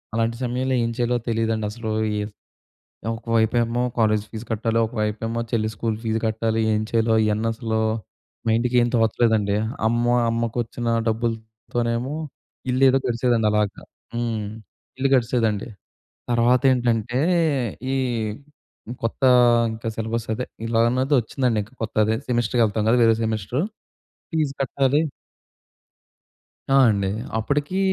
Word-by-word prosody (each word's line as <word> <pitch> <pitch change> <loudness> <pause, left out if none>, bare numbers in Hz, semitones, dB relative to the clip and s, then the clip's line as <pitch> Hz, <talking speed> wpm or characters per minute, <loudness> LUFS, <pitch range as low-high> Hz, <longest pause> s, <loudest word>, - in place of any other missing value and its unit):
అలాంటి 115 0 0
సమయంలో 130 +2 0
ఏం 115 - 0
చేయాలో 120 0 +1
తెలీదండసలు, 110 0 -1 0.3
ఈహ్, 105 0 -3 0.8
ఒక 115 0 -9
వైపేమో 115 +1 +2 0.2
కాలేజీ 110 -2 +2
ఫీజు 110 +1 -7
కట్టాలి, 115 +1 0
ఒక - - -14
వైపేమో 115 +2 -2
చెల్లి 110 -2 +1
స్కూల్ 115 -2 -2
ఫీజు 110 0 0
కట్టాలి 110 0 0
ఏం 105 - +1
చేయాలో 115 -1 +2
ఇయన్నసలు 110 +1 -1 0.7
మైండ్‌కేం 120 +1 +3
తోచలేదండి. 110 -2 +2 0.3
అమ్మో 120 +1 +2 0.2
అమ్మకు 115 0 -1
వచ్చిన 120 +1 -6 0.2
డబ్బులతోనేమో 115 +2 -2 0.6
ఇల్లు 130 +2 +3
ఏదో 135 +1 +3
గడిచేదండలాగా. 115 -4 +1 0.3
హ్మ్. 115 -3 -2 0.5
ఇల్లు 135 0 +2
గడిచేదండి. 115 -4 +1 0.6
తర్వాతేంటంటే, 120 -1 +2 0.7
ఈ - - +1 1.1
కొత్త 115 +4 -3 0.5
ఇంకా 115 +1 -6
సిలబస్ 115 +1 -3
అదే 125 +3 -3 0.2
ఇలా 115 0 +2
అన్నదొచ్చిందండి 130 -2 +1
ఇంకా 110 - -18
కొత్తది 110 0 +1
సెమిస్టర్‌కి 120 0 +2
వెళ్తాం 105 0 -1
కదా! 125 - +4
వేరే 115 -1 +5
సెమిస్టర్ 110 - -1 0.7
ఫీజ్ 155 -3 0
కట్టాలి 135 +2 +2 1.7
ఆ! - - +6
అండి. 100 -2 0 0.3
అప్పడికి 145 - -1
115 Hz, 110 wpm, -23 LUFS, 110-120 Hz, 1.7 s, ఆ